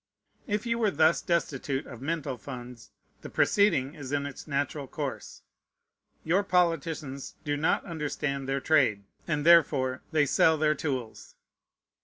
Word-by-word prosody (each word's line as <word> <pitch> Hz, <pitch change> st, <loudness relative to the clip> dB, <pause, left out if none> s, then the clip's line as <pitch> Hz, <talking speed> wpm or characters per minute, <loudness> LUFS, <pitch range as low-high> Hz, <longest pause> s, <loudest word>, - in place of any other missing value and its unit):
If 210 Hz, 0 st, -1 dB
you 235 Hz, 0 st, 0 dB
were 220 Hz, -3 st, +3 dB
thus 160 Hz, -1 st, +3 dB
destitute 145 Hz, -5 st, -1 dB
of 120 Hz, -3 st, -10 dB
mental 150 Hz, -2 st, -2 dB
funds, 125 Hz, -2 st, -9 dB, 0.3 s
the -, -, -8 dB
proceeding 150 Hz, -10 st, +2 dB
is 145 Hz, -5 st, -8 dB
in 145 Hz, -1 st, 0 dB
its 140 Hz, +2 st, -8 dB
natural 140 Hz, 0 st, -2 dB
course. -, -, -6 dB, 0.8 s
Your 175 Hz, +5 st, +2 dB
politicians 165 Hz, -7 st, -1 dB
do 145 Hz, -1 st, -1 dB
not 150 Hz, +2 st, +1 dB
understand 145 Hz, -4 st, -3 dB
their 135 Hz, 0 st, 0 dB
trade; 125 Hz, -11 st, +3 dB, 0.2 s
and 150 Hz, -3 st, -1 dB
therefore 140 Hz, -6 st, +4 dB
they 155 Hz, -2 st, +3 dB
sell 160 Hz, +3 st, +4 dB
their 155 Hz, 0 st, +3 dB
tools. 130 Hz, -7 st, -5 dB
145 Hz, 140 wpm, -28 LUFS, 135-165 Hz, 0.8 s, therefore